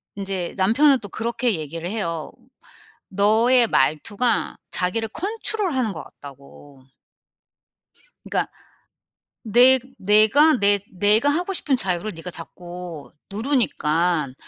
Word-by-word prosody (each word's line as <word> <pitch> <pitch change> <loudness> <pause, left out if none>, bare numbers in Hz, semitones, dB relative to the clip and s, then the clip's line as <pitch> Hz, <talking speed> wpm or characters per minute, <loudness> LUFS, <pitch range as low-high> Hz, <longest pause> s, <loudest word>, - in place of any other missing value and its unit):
인제 195 -3 -4
남편은 255 +9 +3
또 205 - -10
그렇게 235 +2 -1
얘기를 165 +3 -6
해요. 170 -7 -4 0.8
너의 225 +5 +3
말투가 205 - 0 0.2
자기를 215 +5 -2
컨트롤하는 370 - -2
것 160 -4 -7
같다고. 140 0 -15 1.4
그러니까 - - -2 0.9
"내 245 +4 +6 0.2
내가 215 +10 +4
내 205 -1 +4
내가 210 +8 +3
하고 350 +6 -2
싶은 285 -6 0
자유를 195 -1 -2
니가 165 +2 -8
자꾸 175 -2 -10 0.2
누르니깐 175 - 0
205 Hz, 230 characters per minute, -22 LUFS, 175-245 Hz, 1.4 s, 내